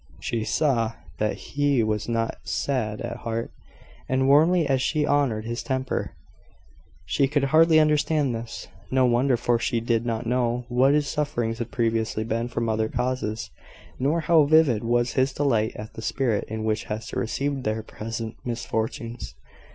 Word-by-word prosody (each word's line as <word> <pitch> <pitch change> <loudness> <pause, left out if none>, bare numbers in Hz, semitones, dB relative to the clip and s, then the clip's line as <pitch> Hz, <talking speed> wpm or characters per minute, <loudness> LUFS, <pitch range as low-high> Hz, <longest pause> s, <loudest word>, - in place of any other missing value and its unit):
She 115 -2 -2
saw 115 -7 +1 0.3
that 105 0 0
he 145 -4 0
was 110 +1 -1
not 115 -1 -1
sad 110 -6 -2
at 120 - -4
heart; 115 -1 -4 0.6
and 130 0 +2
warmly 160 +5 +5
as 135 -2 +1
she 150 +2 +1
honoured 135 -7 +1
his 120 +2 -3
temper, 130 -1 -2 0.9
she 140 - +2
could 145 0 0
hardly 155 +3 +5
understand 150 -3 +2
this. 115 0 -6 0.2
No 130 0 +3
wonder 125 +1 +3
for 120 0 +1
she 120 0 0
did 115 0 0
not 115 0 -2
know 120 0 0
what 130 +3 +4
his 150 -1 +1
sufferings 120 -7 -2
had 120 - -3
previously 115 -2 0
been 115 +1 -2
from 115 -1 -2
other 110 0 0
causes, 125 -3 -2 0.5
nor 150 +6 +1
how 155 -1 +5
vivid 145 -7 +4
was 120 +1 +1
his 130 +1 +1
delight 115 -6 +1
at 105 +1 -8
the - - -8
spirit 115 -3 0
in 110 0 -4
which 110 0 -1
Hester 110 +1 -4
received 135 +3 -2
their 110 +1 -1
present 115 +1 -6
misfortunes. 115 0 -4
120 Hz, 160 wpm, -25 LUFS, 115-140 Hz, 0.9 s, warmly